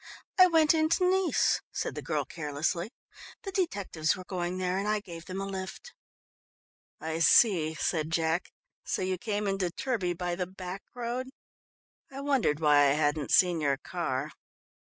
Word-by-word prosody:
"I 370 - +10
went 320 -3 +4
into 320 +3 +2
Nice," 375 -1 +2
said - - -3
the - - -5
girl - - -1
carelessly. 160 +4 -2 0.5
"The 390 - -5
detectives 200 - 0
were 185 - -8
going 180 -1 -3
there 185 0 -1
and 200 - -2
I 215 0 +1
gave 170 -4 -10
them 185 0 -5
a 195 - -3
lift." 195 - -6 1.1
"I 160 0 -3
see," 165 -1 +5
said 155 0 -1
Jack, 165 +1 0 0.3
"so - - -2
you 185 -1 -1
came 210 0 -2
into 195 -2 0
Turbie 190 -5 -2
by 175 -1 -2
the 180 0 -2
back 185 +1 -7
road? 245 +1 -3 0.8
I 270 - -7
wondered 270 - +1
why 145 -2 +5
I 140 - +4
hadn't 150 -1 0
seen 175 -3 +4
your 140 -2 +1
car." 150 -3 -3
185 Hz, 160 wpm, -29 LUFS, 160-220 Hz, 1.1 s, I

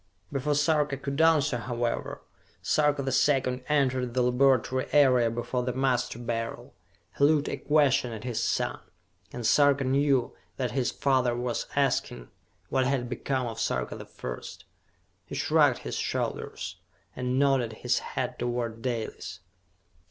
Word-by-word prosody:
Before 145 +1 0
Sarka 150 -1 +2
could 140 +2 -2
answer, 150 -5 +3
however, 120 -1 -3 0.4
Sarka 150 -1 +2
the 135 - -1
Second 130 -1 +2
entered 130 -4 +1
the 125 - +3
laboratory 130 0 +2
area 130 -5 +5
before 120 +2 -2
the 125 0 -2
Master 130 -3 0
Beryl. 115 -1 -4 0.5
He - - +3
looked 150 0 +4
a - - -3
question 145 -5 +2
at 110 -1 -7
his 120 -3 -2
son, - - -1 0.5
and 120 -2 -6
Sarka 140 +3 +4
knew 135 -1 +1 0.2
that 125 -3 -1
his 130 -3 0
father 130 -3 +1
was 120 0 -2
asking - - 0 0.4
what 130 -1 +1
had 130 -3 -1
become 130 +1 -2
of 115 -2 -5
Sarka 65 - -1
the - - -9
First. 60 -1 -8 0.6
He - - -8
shrugged - - +3
his - - -3
shoulders, - - -3 0.4
and 125 0 -1
nodded 135 -4 +2
his 120 +2 0
head 125 -1 -4
toward 120 -2 -2
Dalis. 115 -6 -4
130 Hz, 145 wpm, -28 LUFS, 120-140 Hz, 0.6 s, area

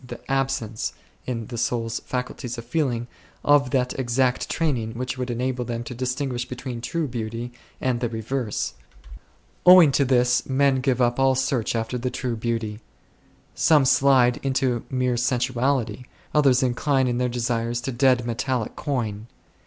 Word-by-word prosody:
the 125 - -8
absence, 135 -5 -1 0.3
in 115 -3 -3
the 120 +2 -7
soul's 115 -1 -1
faculties 125 -1 -5
of 115 - -7
feeling, 120 -4 -1 0.4
of 145 -2 +4
that 125 -1 0
exact 125 0 +1
training 125 -9 -1
which 125 +1 -3
would 125 -1 -4
enable 125 +1 -1
them 120 -1 -4
to 125 - -7
distinguish 125 0 -2
between 125 -1 -6
true 165 +5 -2
Beauty 115 0 -5 0.3
and 125 -2 0
the 120 -1 -1
reverse. 115 - -3 0.9
Owing 180 -5 +8
to 140 - +3
this 125 -2 +3
men 135 0 +3
give 130 -1 +2
up 120 +1 +1
all 135 0 +4
search 130 -3 0
after 115 +2 -2
the 125 +1 -1
true 125 -1 -3
Beauty. 115 -2 -3 0.7
Some 150 -4 +4
slide 130 -2 +4
into 130 -3 0
mere 125 -2 0
sensuality. 125 +1 0 0.3
Others 135 -4 +4
incline 130 +1 +1
in 120 0 0
their 125 0 +1
desires 120 -1 -1
to 135 - -3
dead 125 -1 +3
metallic 120 0 -2
coin. 115 -7 -3
125 Hz, 155 wpm, -24 LUFS, 120-130 Hz, 0.9 s, Owing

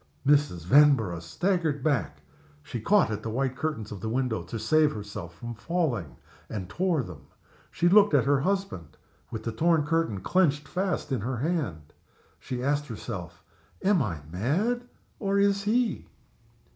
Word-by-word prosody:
Mrs. 140 - +2
Vanborough 125 - +5
staggered 155 - -1
back. 120 - -1 0.4
She 120 - -6
caught 200 - +3
at 105 0 -3
the 110 - -4
white 130 +3 -1
curtains 135 -8 -3
of 100 -3 -7
the 110 - -3
window 125 -1 -1
to 115 - -6
save 150 +8 +3
herself 105 -5 -7
from 120 +4 -7
falling, 125 - -2 0.3
and 100 -4 -5
tore 175 - 0
them. 80 -8 -11 0.4
She 175 - +1
looked 200 -2 +6
at 135 - +5
her 140 0 +3
husband, 190 - -2 0.3
with 110 - -6
the 115 - -2
torn 165 +3 +2
curtain 165 - 0
clenched 150 - +2
fast 185 -5 -2
in 130 -5 0
her 125 +3 -2
hand. 120 - -2 0.5
She 125 -1 -5
asked 145 +2 0
herself, 90 -7 -7 0.4
"Am 190 -3 +4
I 85 - -2
mad? 190 - 0 0.3
or 200 -1 0
is 200 0 +3
he?" 235 +2 +1
135 Hz, 160 wpm, -27 LUFS, 105-170 Hz, 0.5 s, looked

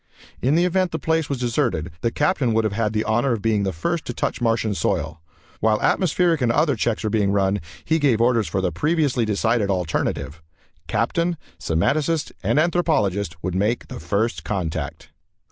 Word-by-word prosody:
In 135 +5 +2
the 170 +2 +3
event 185 0 +1
the 160 - -2
place 160 0 0
was 140 - -1
deserted, 120 - -1
the 115 - +1
Captain 145 -3 +1
would 115 - +3
have 110 -2 -1
had 110 0 0
the 110 0 0
honor 120 +4 +1
of 110 - -3
being 110 -2 +2
the 95 -1 0
first 160 - -2
to 120 - -5
touch - - -2
Martian 115 -2 +1
soil. 80 -5 -2 0.4
While 110 0 +2
atmospheric 175 -3 +2
and 120 -2 +3
other 145 +2 +2
checks 115 0 -1
were 110 - -1
being 100 -3 +2
run, 100 0 +1 0.2
he 160 +1 +2
gave 135 -7 +3
orders 115 -2 +3
for 95 - -1
the 90 -2 0
previously 140 - +1
decided 110 0 +1
alternative. 85 -3 -2 0.5
Captain, 170 0 0 0.2
semanticist 150 - 0
and - - +1
anthropologist 130 - +1
would 90 0 -2
make 105 +6 0
the - - -7
First 95 +1 -1
Contact. 85 -2 -4
115 Hz, 180 wpm, -22 LUFS, 100-150 Hz, 0.5 s, the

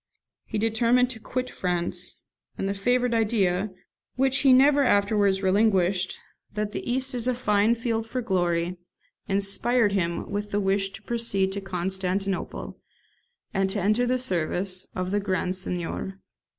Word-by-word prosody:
He - - -4
determined 235 +3 +3
to 230 - -4
quit 255 +3 -3
France; 180 0 -2 0.4
and 195 - -2
the 200 - 0
favourite 245 +4 +1
idea, 210 -4 +1 0.5
which 265 0 +3
he 275 - +5
never 280 +3 +6
afterwards 200 -3 +2
relinquished, 190 -2 +2 0.4
that 210 0 -2
the 240 - -3
East 260 +1 +1
is 245 -1 -1
a 255 - +1
fine 215 -1 +2
field 225 -1 -2
for 255 - -3
glory, 175 -3 0 0.5
inspired 205 +3 +1
him 170 -4 -1
with 205 +1 -3
the 205 - 0
wish 195 0 +1
to - - -11
proceed 215 -5 0
to 200 +1 -4
Constantinople, 190 +1 -3 0.7
and 195 0 +1
to 205 +2 -2
enter 215 +6 +2
the 255 +1 +2
service 185 -4 -1
of 185 0 -2
the 205 - +2
Grand 185 -2 -1
Seignior. 185 +1 -4
200 Hz, 150 wpm, -26 LUFS, 190-235 Hz, 0.7 s, never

